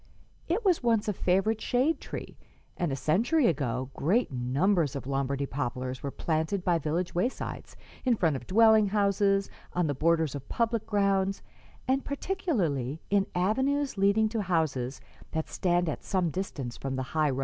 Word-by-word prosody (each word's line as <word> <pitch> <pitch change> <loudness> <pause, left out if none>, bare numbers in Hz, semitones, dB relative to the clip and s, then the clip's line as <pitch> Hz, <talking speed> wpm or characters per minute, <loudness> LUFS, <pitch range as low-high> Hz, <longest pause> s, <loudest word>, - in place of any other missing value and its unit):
It 405 +7 -1
was 365 -4 +3
once 230 -4 +2
a 210 - +1
favorite 195 +5 +1
shade 265 +6 +1
tree, - - -7 0.4
and 175 -4 -1
a - - 0
century 230 - +2
ago 130 - 0
great 195 - +1
numbers 145 +5 +1
of 140 - -5
Lombardy 140 +1 -1
poplars 130 -1 -3
were 140 - -3
planted 160 +6 -1
by 175 -2 +3
village 165 +4 -2
waysides, 185 +9 -3 0.3
in 250 -3 +3
front 165 -8 +1
of 125 -2 -7
dwelling 220 0 +5
houses, 200 -1 +2 0.3
on 180 -1 +1
the 145 - 0
borders 160 +1 +2
of 140 -2 -8
public 230 -1 0
grounds, 195 -2 +1 0.4
and 265 +1 +1
particularly 195 - -1
in 200 -1 +3
avenues 265 +10 +1
leading 200 +2 +3
to 225 -1 -1
houses 155 -8 -1 0.3
that 160 -1 -1
stand 175 -1 +1
at 155 - -3
some 180 -4 0
distance 145 -10 -4
from 135 -1 -4
the 130 - -2
high 155 -2 +3
road. 130 -1 -2
180 Hz, 165 wpm, -29 LUFS, 145-220 Hz, 0.4 s, dwelling